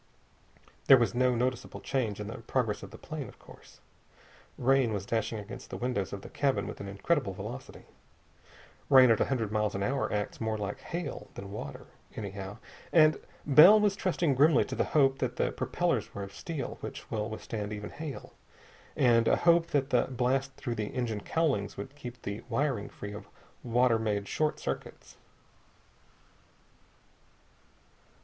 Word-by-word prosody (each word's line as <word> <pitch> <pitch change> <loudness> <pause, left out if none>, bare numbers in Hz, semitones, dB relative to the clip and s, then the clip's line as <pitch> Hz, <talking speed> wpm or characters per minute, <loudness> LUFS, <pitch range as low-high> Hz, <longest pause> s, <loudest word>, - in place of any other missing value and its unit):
There 135 - +10
was 120 -2 +1
no 125 0 +2
noticeable 125 +1 -2
change 115 -7 -2
in 105 - -4
the 110 - -7
progress - - -1
of - - -8
the - - -11
plane, - - -6
of - - -15
course. - - -17 0.8
Rain 130 -2 +3
was 100 -2 -3
dashing 110 0 -1
against 105 0 -8
the - - -5
windows 120 -6 -2
of 100 -1 -6
the - - -9
cabin 140 -2 0
with - - -7
an 100 - -6
incredible 100 - 0
velocity. 115 +8 -8 1.0
Rain 130 -3 +8
at 110 - +3
a - - +4
hundred 115 -6 -1
miles 105 -1 0
an 100 - -1
hour 135 +5 0
acts 105 +2 -3
more 110 -1 -1
like 100 -1 -4
hail 170 -4 -5
than 100 0 -8
water, 105 - -7 0.3
anyhow, 100 -1 -6 0.3
and 155 -2 +5 0.3
Bell 155 +9 +9
was 205 -2 +2
trusting 175 -6 +1
grimly 145 +1 +5
to - - -5
the - - +1
hope 135 -2 +4
that - - -1
the - - 0
propellers - - -1
were 100 - -4
of 100 - -9
steel, 155 -7 -5
which - - -8
will 110 0 -2
withstand 110 -1 -5
even 105 -1 -6
hail, 155 -3 -7 0.6
and 115 -2 +4
a - - +5
hope 170 -1 +4
that 140 -4 0
the 125 - +4
blast 135 +1 -1
through 120 -4 -4
the 110 -2 -3
engine 115 -5 -2
cowlings 135 -9 0
would 135 - -7
keep 125 -4 -8
the 100 +2 -4
wiring 125 -3 0
free 100 0 -8
of 105 -1 -9 0.4
water 120 -1 +3
made 105 -2 -1
short 155 -1 0
circuits. - - -6
120 Hz, 170 wpm, -30 LUFS, 105-135 Hz, 1.0 s, There